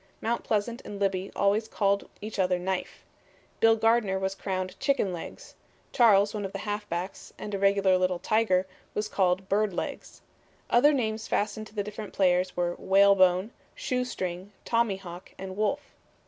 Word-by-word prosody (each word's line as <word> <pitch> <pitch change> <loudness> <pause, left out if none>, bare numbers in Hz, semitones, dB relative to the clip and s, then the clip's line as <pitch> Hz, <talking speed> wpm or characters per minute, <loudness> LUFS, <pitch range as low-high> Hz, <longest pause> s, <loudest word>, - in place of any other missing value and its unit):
Mount 235 +2 -1
Pleasant 225 +3 -1
and 205 - -8
Libby 195 -1 -1
always 205 +3 +2
called 200 -2 0
each 215 0 -6
other 180 -1 +2
Knife. 185 +1 -4 0.6
Bill 225 0 +5
Gardner 225 -3 +2
was 190 0 -1
crowned 185 -1 -4
Chicken 275 -10 +1
Legs, 170 - -8 0.4
Charles, 210 -4 +5
one 210 -1 -3
of 195 - -5
the - - -3
halfbacks, 205 -3 -4
and 210 - -7
a 200 - -1
regular 195 -1 +3
little 185 -1 +1
tiger, 190 -2 +2 0.3
was 210 0 -1
called 190 -2 +1
Bird 205 0 +1
Legs. - - -6 0.5
Other 275 +5 +6
names 220 -5 -1
fastened 215 +1 -1
to 215 - -19
the 205 - -1
different 210 0 -7
players 180 -1 +2
were 175 0 0
Whale 200 +1 +5
Bone, 185 +2 +3 0.2
Shoe 255 - -1
String, 185 -5 -5
Tommyhawk 195 -6 -2
and 190 -1 -7
Wolf. 215 +8 0
200 Hz, 160 wpm, -28 LUFS, 185-215 Hz, 0.6 s, Other